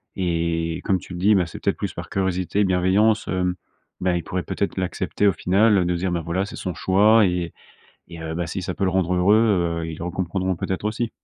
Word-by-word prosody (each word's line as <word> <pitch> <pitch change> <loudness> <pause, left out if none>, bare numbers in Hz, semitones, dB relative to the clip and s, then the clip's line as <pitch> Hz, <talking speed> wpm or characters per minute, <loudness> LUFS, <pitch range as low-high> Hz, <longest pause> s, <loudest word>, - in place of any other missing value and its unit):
et 85 -2 -1
comme 95 -2 +2
tu - - -13
le 90 - -6
dis, 105 +4 +4
ben, 90 -3 +2
c'est 85 - -9
peut - - +1
être - - -13
plus - - -4
par - - -7
curiosité, 95 +1 0
bienveillance, 95 +4 +2
hem, 90 -1 0 0.5
ben 90 -1 +1
ils 85 - -2
pourraient 90 +3 -3
peut - - -5
être 100 - -1
l'accepter 95 +2 0
au 100 - +4
final 95 +3 +3
de 90 - +1
se - - -3
dire: 95 +1 -1
«Bah 85 -1 -1
voilà, 90 +3 -1
c'est 100 - -9
son 90 - -4
choix 105 +5 +4
et 90 -2 -1 0.6
et 85 -1 -9
heu, 80 0 -4
bah, 85 0 -2
si 95 +3 -4
ça 90 - -4
peut 100 - -1
le 95 - +2
rendre 90 -1 +1
heureux», 90 -3 +3
heu, - - -3
ils 80 - -7
le - - -5
re 90 - -3
comprendront, 95 +1 -1
peut - - -4
être, 95 - -2
aussi. 110 +2 -1
90 Hz, 255 wpm, -23 LUFS, 85-100 Hz, 0.6 s, dis